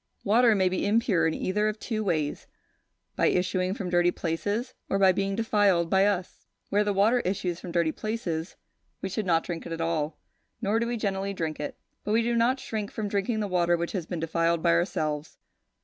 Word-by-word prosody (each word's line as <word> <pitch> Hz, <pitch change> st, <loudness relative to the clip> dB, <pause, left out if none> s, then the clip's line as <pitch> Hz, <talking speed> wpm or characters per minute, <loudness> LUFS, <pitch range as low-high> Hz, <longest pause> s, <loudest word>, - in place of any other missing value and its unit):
Water 230 Hz, +1 st, +5 dB
may 190 Hz, -2 st, +3 dB
be 185 Hz, +2 st, 0 dB
impure 205 Hz, -6 st, +3 dB
in 160 Hz, -, -1 dB
either 210 Hz, +3 st, 0 dB
of 215 Hz, 0 st, -2 dB
two 215 Hz, -2 st, -2 dB
ways, 155 Hz, -7 st, -1 dB, 0.7 s
by -, -, +3 dB
issuing 185 Hz, +1 st, +1 dB
from 185 Hz, -4 st, -4 dB
dirty 175 Hz, 0 st, +4 dB
places, 205 Hz, +10 st, -2 dB, 0.2 s
or 195 Hz, -, +1 dB
by 190 Hz, -1 st, +6 dB
being 195 Hz, +1 st, -1 dB
defiled 205 Hz, -6 st, +2 dB
by 195 Hz, +1 st, +5 dB
us. 190 Hz, -3 st, -3 dB, 0.2 s
Where 205 Hz, +1 st, +3 dB
the 205 Hz, -, 0 dB
water 210 Hz, +5 st, +3 dB
issues 180 Hz, -4 st, -2 dB
from 180 Hz, -, -7 dB
dirty 170 Hz, -2 st, +2 dB
places, 180 Hz, -6 st, -4 dB, 0.5 s
we 190 Hz, -, -1 dB
should 200 Hz, +1 st, -3 dB
not 165 Hz, -2 st, +3 dB
drink 170 Hz, -1 st, -5 dB
it -, -, -8 dB
at 165 Hz, -, -4 dB
all; 160 Hz, -2 st, -1 dB, 0.4 s
nor 210 Hz, +3 st, +1 dB
do 235 Hz, -, 0 dB
we 240 Hz, 0 st, -2 dB
generally 195 Hz, -2 st, -2 dB
drink 160 Hz, -3 st, -3 dB
it. 150 Hz, -, -5 dB, 0.3 s
But 210 Hz, -, -1 dB
we 230 Hz, +1 st, +3 dB
do 235 Hz, +1 st, 0 dB
not 240 Hz, +3 st, +2 dB
shrink 215 Hz, -4 st, -4 dB
from 210 Hz, -2 st, -4 dB
drinking 210 Hz, +3 st, 0 dB
the 205 Hz, -, -1 dB
water 175 Hz, -2 st, +2 dB
which 170 Hz, 0 st, -3 dB
has 180 Hz, -5 st, -4 dB
been 175 Hz, -, -4 dB
defiled 165 Hz, 0 st, 0 dB
by 170 Hz, -, +4 dB
ourselves. 155 Hz, -3 st, -1 dB
190 Hz, 210 wpm, -27 LUFS, 170-210 Hz, 0.7 s, by